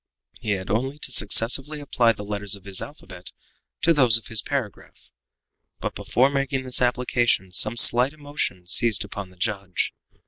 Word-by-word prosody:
He 110 -4 -1
had 95 -1 -4
only 130 +6 -1
to 140 - -4
successively 125 +8 +3
apply 120 -5 +2
the 105 - -9
letters 105 0 -2
of 100 - -16
his 100 -1 -3
alphabet 95 - -10 0.5
to 165 - +5
those 125 -7 +5
of 115 - -11
his 115 -2 +1
paragraph. 130 -8 -6 0.7
But - - -4
before 130 +3 +1
making 135 -1 -1
this 130 -1 0
application 120 -5 +1
some 110 +5 +1
slight 125 +3 +5
emotion 145 -12 -5
seized 110 +3 +1
upon 100 -2 -7
the 90 - -20
judge. 100 -3 -2
115 Hz, 165 wpm, -24 LUFS, 100-135 Hz, 0.7 s, to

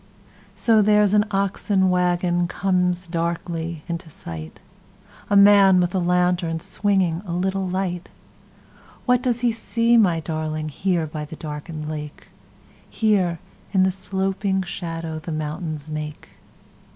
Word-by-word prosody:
So, 225 -2 +4
there's 210 -1 +4
an 210 0 +4
oxen 195 -1 +1
wagonComes 180 0 +1
darkly 170 -1 -3
into 170 -1 -5
sight:A 80 - -9
man 200 -2 +7
with 175 0 +1
a 190 - +1
lantern, 180 -1 +1
swingingA 185 -1 0
little 190 +2 -1
light. 180 -1 -3 1.0
What 250 -1 +3
does 245 -2 0
he 240 -1 +3
see, 230 +1 +1
my 180 -7 +4
darlingHere 155 +2 -2
by 150 0 -5
the 160 +2 -9
darkened 150 0 -6
lake? 150 -1 -7 0.6
Here, 195 -6 +1 0.4
in 190 -1 +4
the 190 - +3
sloping 190 +1 -1
shadowThe 165 -2 -5
mountains 155 0 -4
make? 150 0 -6
180 Hz, 115 wpm, -22 LUFS, 160-195 Hz, 1.0 s, man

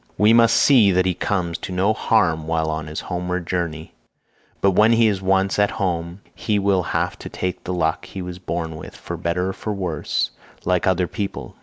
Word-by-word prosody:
We 105 +2 +5
must 115 0 +5
see 120 -8 +6
that 90 +1 +2
he 90 - +2
comes 85 -2 -2
to - - -6
no 95 +4 +2
harm 85 -8 +1
while 80 -1 0
on 80 0 -4
his 75 +1 -5
homeward 90 0 -3
journey, 80 -3 -3 0.7
but 100 - +3
when 110 +5 +5
he 115 -1 +4
is 100 -3 0
once 95 +1 +1
at 105 0 +4
home 90 -3 -3
he 105 -2 -1
will 100 -2 +2
have - - -2
to - - -8
take 90 -1 -4
the 90 - -2
luck 80 -2 0
he - - -8
was 90 0 -7
born 85 -3 -4
with - - -10
for - - -6
better 90 +3 -1
or 105 - -1
worse 90 -6 -2 0.3
like 90 -1 +1
other 95 -1 +2
people. 100 +2 -5
90 Hz, 200 wpm, -21 LUFS, 85-100 Hz, 0.7 s, see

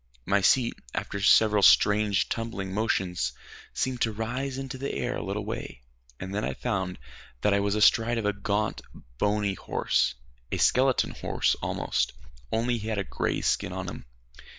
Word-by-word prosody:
My 100 +1 +2
seat, 120 +4 +3 0.2
after 100 - -3
several 105 +1 +5
strange 105 0 +5
tumbling 115 -5 -4
motions, 95 -4 0 0.4
seemed 130 -2 -2
to 115 - +2
rise 125 +5 -3
into 135 -1 -6
the 140 - -3
air 125 +1 -2
a - - -4
little 100 +2 -3
way, 105 - -6 0.4
and 95 +1 -6
then 105 +1 -1
I - - -2
found 95 -3 -2 0.4
that 105 - +3
I 100 - +3
was 100 0 0
astride 115 +2 +4
of 110 - -2
a 105 - +2
gaunt, 105 +2 -1 0.4
bony 105 -1 +1
horse 65 -7 0 0.4
a - - 0
skeleton 130 0 +3
horse - - 0
almost, - - -1 0.4
only 115 +1 0
he 110 - -6
had 110 -2 -1
a 100 - 0
gray - - -2
skin - - 0
on - - -4
him. - - -7
105 Hz, 170 wpm, -27 LUFS, 100-115 Hz, 0.4 s, several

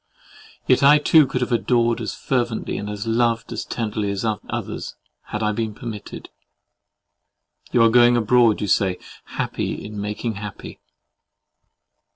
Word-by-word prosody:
Yet 130 - +3
I 145 +2 +7
too 150 0 +5
could 125 0 -3
have 125 - -1
adored 120 0 +1
as 110 - -4
fervently, 120 -4 -2
and 105 - -5 0.2
loved 115 0 0
as - - -4
tenderly 105 -3 -3
as 100 +2 -3 0.2
others, - - -5 0.3
had 105 +1 -4
I 105 - +2
been 110 -1 -3
permitted. 110 -4 -8 1.4
You 120 - +4
are 115 - +6
going 120 +1 +5
abroad, 115 -1 +3
you 105 - -1
say, 95 -2 +2 0.3
happy - - -4
in 105 -1 -6
making 105 +1 -3
happy. 105 -1 -8
115 Hz, 140 wpm, -22 LUFS, 105-120 Hz, 1.4 s, I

